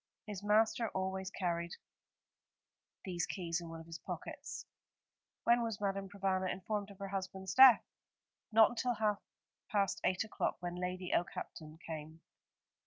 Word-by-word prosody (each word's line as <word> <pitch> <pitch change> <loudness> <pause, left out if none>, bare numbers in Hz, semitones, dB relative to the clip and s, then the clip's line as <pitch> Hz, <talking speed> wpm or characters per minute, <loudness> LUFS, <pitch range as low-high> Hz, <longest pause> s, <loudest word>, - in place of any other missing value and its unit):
His 205 -4 -5
master 220 +2 +3
always 190 0 -1
carried 170 -3 -2 1.3
these 175 -3 -1
keys 175 -2 -2
in 170 - -7
one 165 0 -7
of 165 - -10
his 165 0 -8
pockets. - - -6 0.8
"When 235 0 +5
was 225 -3 -2
Madame 195 -1 -1
Provana 190 -2 0
informed 200 +2 -3
of 200 - -12
her 195 0 -5
husband's 190 -1 -4
death?" 260 -2 +9 0.7
"Not 220 0 +7
until 245 0 0
half 210 -1 +1 0.5
past 200 -3 +1
eight 185 +2 +2
o'clock, 220 - -1
when 175 -1 -4
Lady 180 0 -3
Okehampton 155 -2 -3
came. 160 0 -7
190 Hz, 140 wpm, -35 LUFS, 175-210 Hz, 1.3 s, death